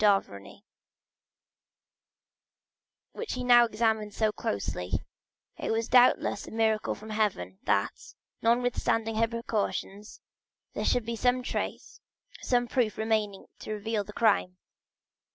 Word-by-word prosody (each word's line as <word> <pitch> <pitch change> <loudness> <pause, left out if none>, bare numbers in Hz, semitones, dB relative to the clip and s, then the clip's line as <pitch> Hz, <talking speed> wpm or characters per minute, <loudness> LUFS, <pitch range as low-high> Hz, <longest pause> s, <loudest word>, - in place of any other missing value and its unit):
d'Avrigny, 195 - 0 2.5
which 460 - -5
he 255 - -3
now 240 -1 +7
examined 220 -2 0
so 215 -1 +2
closely; 95 - -4 0.7
it - - -3
was 225 +1 0
doubtless 245 -5 +4
a - - -9
miracle 220 -1 +1
from 220 +1 -10
heaven, 190 - -1
that, - - -1 0.3
notwithstanding 225 -1 +1
her 230 +1 +3
precautions, 215 -3 -3 0.5
there - - -3
should 245 -3 +2
be 235 0 -3
some 250 +2 +1
trace, - - -4 0.4
some 245 -1 +1
proof 235 -4 0
remaining 215 -3 -1
to 215 - -5
reveal 215 0 -2
the 205 - -10
crime. 195 -5 +2
220 Hz, 115 wpm, -28 LUFS, 210-235 Hz, 2.5 s, now